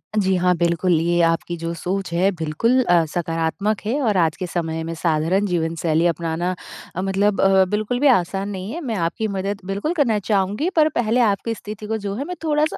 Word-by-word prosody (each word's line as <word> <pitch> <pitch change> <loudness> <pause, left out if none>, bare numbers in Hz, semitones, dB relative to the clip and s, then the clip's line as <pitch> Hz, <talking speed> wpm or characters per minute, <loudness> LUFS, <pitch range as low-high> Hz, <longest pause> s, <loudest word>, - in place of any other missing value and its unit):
जी 190 -2 +2
हाँ, 180 0 +2
बिल्कुल। 170 +1 +1
ये 175 +1 +2
आपकी 165 +1 +1
जो 165 0 -4
सोच 180 +2 -3
है 185 +3 +3
बिल्कुल 180 +10 +1
अ, 175 -6 +4
सकारात्मक 170 +5 -1
है 245 +7 0
और 215 -6 +1
आज 160 -2 +2
के 185 - -4
समय 165 -2 -3
में 165 +1 -4
साधारण 165 +5 +1
जीवन-शैली 165 -2 0
अपनाना 170 +1 -1 0.4
अ, 185 - -2
मतलब 195 +1 +1
अ, 190 -1 +5
बिल्कुल 215 +4 -1
भी 290 - +4
आसान 195 -4 +2
नहीं 195 +1 -5
है। 340 +4 -5
मैं 235 -6 -3
आपकी 175 +5 -1
मदद 195 0 -3
बिल्कुल 200 - -2
करना 250 -10 +2
चाहूँगी 205 - 0
पर 310 -1 +5
पहले 235 +1 +1
आपकी 225 +1 +1
स्थिति 210 0 -8
को 220 - -1
जो 200 -1 -4
है 270 - -3
मैं 360 +3 -5
थोड़ा-सा 305 0 +1
195 Hz, 200 wpm, -21 LUFS, 170-215 Hz, 0.4 s, अ